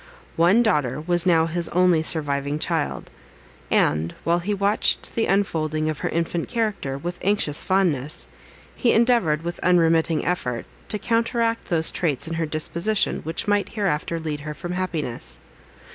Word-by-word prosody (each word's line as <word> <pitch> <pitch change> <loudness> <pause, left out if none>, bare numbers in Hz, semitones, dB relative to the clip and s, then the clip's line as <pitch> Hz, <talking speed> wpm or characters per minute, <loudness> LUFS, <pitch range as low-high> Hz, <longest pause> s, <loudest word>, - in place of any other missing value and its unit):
One 180 +8 +4
daughter 150 - +1
was 175 +2 0
now 165 -2 +4
his 170 +1 -2
only 180 -2 +3
surviving 145 -2 -1
child; - - -2 0.6
and, 80 +3 +1
while 170 +1 +2
he 185 +4 -3
watched 200 +1 +1
the 225 - 0
unfolding 155 -6 0
of 155 - -7
her - - -2
infant 170 0 -2
character, 210 - -2
with 175 +5 -5
anxious 190 -7 +1
fondness, 165 -7 0 0.5
he 240 - +2
endeavoured, 225 -10 +3
with 170 +1 -4
unremitting 165 -2 +3
effort, 125 -9 -2 0.2
to 210 - 0
counteract 230 +1 0
those 160 -2 0
traits 155 -4 0
in 165 - -4
her 165 -1 -1
disposition, 170 +7 0
which 160 +5 -4
might 205 -1 +1
hereafter 170 -5 -1
lead 155 -2 -4
her 150 +1 -6
from 175 +4 -6
happiness. 170 -9 -2
170 Hz, 150 wpm, -23 LUFS, 155-195 Hz, 0.6 s, One